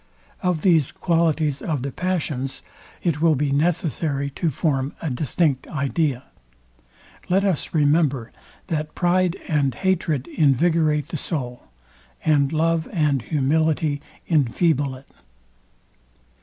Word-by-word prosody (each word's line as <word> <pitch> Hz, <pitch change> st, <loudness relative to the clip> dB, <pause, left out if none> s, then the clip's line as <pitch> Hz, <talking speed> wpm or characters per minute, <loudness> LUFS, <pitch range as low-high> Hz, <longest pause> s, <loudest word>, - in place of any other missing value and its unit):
Of 180 Hz, -4 st, 0 dB
these 165 Hz, -7 st, +3 dB
qualities 160 Hz, -4 st, +1 dB
of 150 Hz, -6 st, -2 dB
the 140 Hz, -, -3 dB
passions, 150 Hz, -7 st, -2 dB, 0.4 s
it 160 Hz, -4 st, 0 dB
will 165 Hz, -2 st, +4 dB
be 145 Hz, +1 st, 0 dB
necessary 145 Hz, -2 st, 0 dB
to 165 Hz, +4 st, -1 dB
form 140 Hz, -1 st, -1 dB
a 160 Hz, -, -3 dB
distinct 140 Hz, +1 st, 0 dB
idea. 140 Hz, -2 st, -1 dB, 1.1 s
Let 195 Hz, +2 st, +3 dB
us 180 Hz, -4 st, -1 dB
remember, 145 Hz, -5 st, +2 dB, 0.3 s
that 155 Hz, -1 st, -3 dB
pride 180 Hz, 0 st, +2 dB
and 145 Hz, -5 st, +1 dB
hatred 170 Hz, -8 st, 0 dB
invigorate 155 Hz, 0 st, +2 dB
the 165 Hz, -, -3 dB
soul; 125 Hz, -7 st, -5 dB, 0.6 s
and 145 Hz, -3 st, +3 dB
love 165 Hz, 0 st, +1 dB
and 150 Hz, -6 st, +1 dB
humility 150 Hz, +2 st, +1 dB, 0.3 s
infeeble 145 Hz, -2 st, +1 dB
it. 135 Hz, -, -18 dB
155 Hz, 115 wpm, -23 LUFS, 140-165 Hz, 1.1 s, will